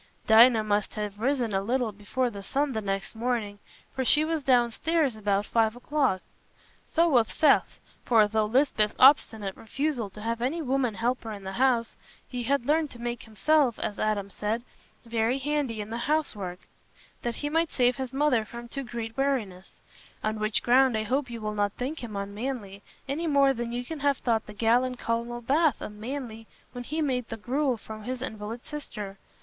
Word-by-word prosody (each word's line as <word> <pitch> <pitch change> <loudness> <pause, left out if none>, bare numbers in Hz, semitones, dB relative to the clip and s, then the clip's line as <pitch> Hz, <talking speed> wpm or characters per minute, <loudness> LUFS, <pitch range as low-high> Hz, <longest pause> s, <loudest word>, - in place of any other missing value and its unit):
Dinah 225 0 +7
must 210 -1 0
have 210 -1 -4
risen 245 -2 0
a 195 - +1
little 240 +2 0
before 225 +5 -2
the 200 -2 -7
sun 280 +8 -1
the 220 -3 -2
next 195 -1 -3
morning, 225 -3 -2 0.3
for 265 - -1
she 300 +4 +4
was 320 -1 -1
downstairs 260 +3 +2
about 205 -1 0
five 225 0 +2
o'clock. 255 -6 0 0.6
So 335 +1 +2
was 245 -8 +4
Seth, 300 -3 +3 0.3
for, 220 -3 +5
through 215 0 +1
Lisbeth's 220 -2 +2
obstinate 220 -7 +5
refusal 260 -2 -2
to 210 +2 -11
have 230 +1 -2
any 270 +8 0
woman 265 -6 0
helper 235 0 -1
in 200 -2 -8
the 190 - -5
house, 240 0 +1 0.3
he 250 -1 -4
had 255 +1 0
learned 305 +1 +2
to 240 - -13
make 240 0 -3
himself, 250 +4 +2
as 205 - -4
Adam 205 -2 -1
said, 220 +4 -2 0.4
"very 230 +2 +1
handy 275 -5 -1
in 210 +1 -7
the 230 - -2
housework," 205 - -1 0.6
that 235 -1 -2
he 290 - -3
might 325 +1 +2
save 250 0 +2
his 260 -2 -4
mother 270 -4 +2
from 235 +2 -9
too 275 +3 -5
great 230 -2 -6
weariness; 225 -10 -2 0.5
on 215 0 -1
which 215 0 0
ground 250 -1 +4
I 215 - -1
hope 255 +4 -1
you 230 -1 -6
will 215 0 -2
not 205 -1 0
think 265 +3 -4
him 220 -3 -6
unmanly, 200 0 -4 0.3
any 310 +5 -2
more 280 -2 +4
than 240 -1 -4
you 245 +1 -3
can 320 +3 -6
have 280 -1 +2
thought 225 -3 0
the 210 - -8
gallant 240 +4 +2
Colonel 235 +1 -2
Bath 295 +5 +2
unmanly 225 +1 -6 0.2
when 245 -1 -7
he 310 +4 -1
made 250 -4 -1
the 225 - -5
gruel 255 +3 0
for 220 0 -9
his 255 +3 -4
invalid 220 0 -6
sister. 210 -10 -7
235 Hz, 185 wpm, -27 LUFS, 215-270 Hz, 0.6 s, Dinah